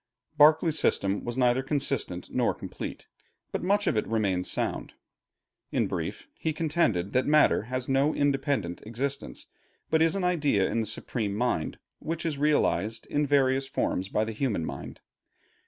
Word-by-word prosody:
Berkeley's 155 +1 +5
system 100 +1 +1
was 120 +1 -4
neither 125 0 +3
consistent 135 - -2
nor - - +1
complete, - - -7 0.5
but - - -2
much 205 +3 +2
of - - +1
it 105 - 0
remains 100 -5 0
sound. - - -2 0.8
In - - +1
brief, - - -4
he 160 - -1
contended 150 - 0
that 130 - +2
matter 150 0 +5
has 130 +1 -3
no 135 +3 +2
independent 135 - 0
existence, 135 +6 -4 0.5
but 160 0 +3
is 165 +2 +3
an 195 - -1
idea 150 - +2
in 115 - -1
the 110 - -1
supreme 110 -1 -3
mind, 115 -8 -1 0.2
which 165 +1 -4
is 150 -4 -2
realized 115 - +1
in 145 0 +1
various 135 -1 +2
forms 95 -7 -1
by 105 +1 +1
the 110 - -4
human 110 - -1
mind. - - -7
135 Hz, 155 wpm, -28 LUFS, 110-150 Hz, 0.8 s, Berkeley's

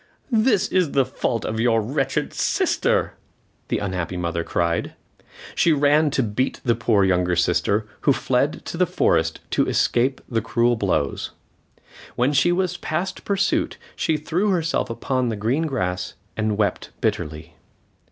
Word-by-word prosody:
"This 215 -3 +3
is 180 -6 +1
the 135 -2 +3
fault 120 -3 -2
of 110 +1 -3
your 115 -1 +3
wretched 135 +6 -1
sister," - - +1 0.5
the - - 0
unhappy 90 -3 -3
mother 85 -1 -2
cried. 85 0 -1 0.6
She 165 - +3
ran 150 +1 +3
to 140 -2 0
beat 115 +4 -1
the 120 - +4
poor 110 -2 +2
younger 90 -2 +2
sister, 90 +5 +1
who 145 - +3
fled 130 +2 0
to - - -5
the 180 0 +3
forest 80 - +1
to - - +2
escape 130 +3 +1
the 115 -2 -1
cruel 120 +2 +2
blows. 95 -10 -1 0.8
When 125 +4 +2
she 140 +5 +4
was 180 0 0
past 170 +5 -3
pursuit, 195 -1 0 0.2
she 160 - 0
threw 170 +7 0
herself 165 -4 0
upon 130 +1 -1
the 110 - -2
green 125 +10 0
grass 90 -10 -2 0.2
and 110 -1 -1
wept 105 -2 -1
bitterly. 80 +1 -3
120 Hz, 150 wpm, -23 LUFS, 100-155 Hz, 0.8 s, the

